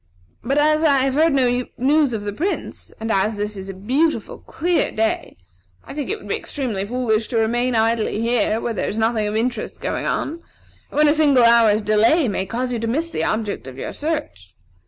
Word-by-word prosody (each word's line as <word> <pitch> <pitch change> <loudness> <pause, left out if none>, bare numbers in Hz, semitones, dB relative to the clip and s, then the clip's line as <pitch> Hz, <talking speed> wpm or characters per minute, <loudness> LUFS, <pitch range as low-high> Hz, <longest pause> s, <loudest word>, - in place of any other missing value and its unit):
But 270 +5 0
as 305 +1 +3
I 285 -3 +4
have 265 0 +1
heard 315 +2 +3
no 250 -2 +2
news 280 -1 +2
of 210 - -4
the 205 0 -4
Prince, 365 - -4
and 225 0 -3
as 210 +2 +1
this 205 +1 -3
is 195 0 -7
a - - -5
beautiful, 265 - -1
clear 345 +1 0
day, 220 - -2 0.5
I - - -9
think 290 -1 -4
it 430 - -1
would - - -13
be - - 0
extremely 225 -9 -3
foolish 230 -2 0
to 235 - -2
remain 240 +2 +1
idly 225 -1 +1
here, 230 -1 +1
where 230 - -2
there 195 - -2
is 215 - -4
nothing 220 -1 +1
of 210 - -3
interest 240 +3 -2
going - - -3
on, 330 +3 -2 0.5
and - - -8
when 300 0 +5
a 295 - +5
single 290 -5 +4
hour's 230 -2 +5
delay 225 +9 +3
may 195 -2 -2
cause 250 +4 -2
you 235 - -2
to 230 - -3
miss 320 +8 -1
the - - -2
object 215 -8 -2
of 130 0 -9
your - - -5
search. 290 - -4
235 Hz, 215 wpm, -21 LUFS, 215-285 Hz, 0.5 s, when